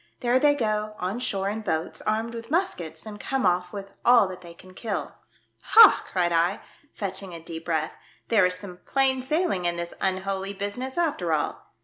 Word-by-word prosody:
There 245 0 +3
they 290 +1 +4
go 215 -4 -1
on 190 +6 -3
shore 195 -6 -1
in 215 +2 -2
boats, 160 -5 -2
armed 225 +2 0
with 230 0 -8
muskets, 180 - -2
and 210 -1 -8
come 270 -3 -1
off 180 0 +1
with 195 -1 -7
all 240 -4 +6
that 185 -1 -8
they 170 -1 -12
can 185 +2 -15
kill." 210 +1 -5 0.4
Ha! 450 -3 +7
" - - -17
cried 175 -2 +1
I, 170 +4 +1 0.3
fetching 190 -3 -5
a - - -7
deep 165 0 -8
breath, 160 -2 -1 0.2
" - - -35
there 210 -5 +5
is 180 - -1
some 180 -2 -9
plain 265 +6 +2
sailing 305 - 0
in 175 0 +1
this 170 0 -5
un 190 -1 +1
holy 195 0 -3
business 205 - -5
after 290 - 0
all. 150 - -3
195 Hz, 205 wpm, -25 LUFS, 180-240 Hz, 0.4 s, Ha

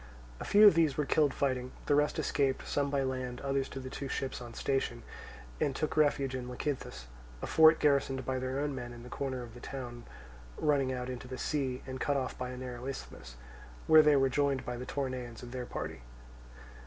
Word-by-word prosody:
A - - -5
few 210 +1 +7
of 205 - +10
these 160 -4 +2
were 150 - +1
killed 145 +1 +3
fighting; 130 -2 -1
the - - +2
rest 150 +1 +2
escaped, 135 -2 0
some 140 -1 0
by 140 -1 +1
land, 130 -1 -3
others 135 -1 -1
to 135 - -6
the 130 0 -7
two 140 - -5
ships 135 -1 -3
on 120 - -7
the - - -11
station, 130 -3 -1 0.6
and 135 - 0
took 155 - -2
refuge 145 -3 +2
in 125 -1 -4
Lecythus, 125 - -4 0.3
a - - -4
fort 160 0 +6
garrisoned 140 -2 +2
by 130 -1 -1
their 130 +1 -2
own 145 0 -1
men 120 -2 -6
in 120 0 -10
the 125 - -10
corner 130 -2 -3
of 115 -2 -10
the 120 - -11
town 120 -2 -7 0.5
running 140 -3 +2
out 125 -1 -3
into 125 -1 -6
the 130 0 -6
sea 130 -4 -2
and 130 -1 -6
cut 145 -1 +1
off 130 -2 -2
by 125 0 -4
a 125 - -6
narrow 125 0 -6
isthmus; 65 - -7 0.5
where 155 0 +8
they 150 -1 +5
were 135 -1 +4
joined 140 0 +1
by 125 - -3
the 125 +1 -6
Toronaeans 130 -4 -4
of 120 - -8
their 125 -1 -5
party. - - -5
130 Hz, 215 wpm, -32 LUFS, 125-140 Hz, 0.6 s, of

